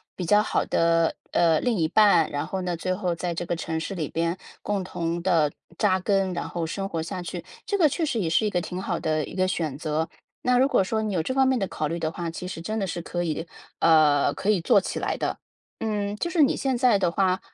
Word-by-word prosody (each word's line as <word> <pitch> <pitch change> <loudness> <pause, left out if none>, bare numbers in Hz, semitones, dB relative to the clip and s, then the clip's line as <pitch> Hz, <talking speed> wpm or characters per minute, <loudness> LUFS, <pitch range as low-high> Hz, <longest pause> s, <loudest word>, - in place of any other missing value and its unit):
比 185 - -4
较 210 +5 +4
好 - - 0
的， 165 0 +2 0.2
呃， 165 -2 +3
另 245 -2 +1
一 160 - +2
半， 185 -4 +5
然 145 - -2
后 190 - -3
呢， 180 -2 -2
最 185 +3 -1
后 180 -3 -1
在 175 0 -3
这 170 +1 -4
个 175 - 0
城 160 -1 -3
市 195 +4 -4
里 160 -5 -2
边 170 +4 -1 0.2
共 205 -2 -1
同 170 -1 -3
地 165 -5 +3 0.3
扎 190 -3 +3
根， 195 -1 +1
然 - - -3
后 170 - -4
生 195 +4 -3
活 165 -4 -3
下 170 +2 -5
去。 175 - -6 0.2
这 405 - -1
个 340 -6 +4
确 325 +4 -1
实 260 -6 -1
也 170 -5 0
是 195 +6 +2
一 210 - 0
个 180 - 0
挺 180 +2 -5
好 - - -2
的 155 -1 0
一 - - -10
个 185 0 +2
选 160 -6 -2
择。 155 +2 -1 0.4
那 250 0 +3
如 265 - +5
果 240 - +3
说 220 +3 -1
你 210 -3 -2
有 160 - +1
这 260 - -2
方 265 0 +3
面 260 -1 +2
的 195 -5 -1
考 155 - -2
虑 165 - -3
的 160 -2 -2
话， 170 0 -4
其 180 +2 -6
实 170 -2 -6
真 215 +6 -3
的 200 - 0
是 175 -1 -4
可 175 +1 -3
以 165 0 -3 0.3
呃， 155 -3 +5
可 205 - +1
以 195 -5 +1
做 200 +4 +5
起 - - -4
来 - - -2
的。 - - -2 0.4
嗯， 210 -2 -2
就 280 - -2
是 340 -2 +1
你 280 - +4
现 265 -2 0
在 245 -3 +4
的 180 -3 +1
话， 185 0 +1
180 Hz, 280 characters per minute, -25 LUFS, 165-210 Hz, 0.4 s, 半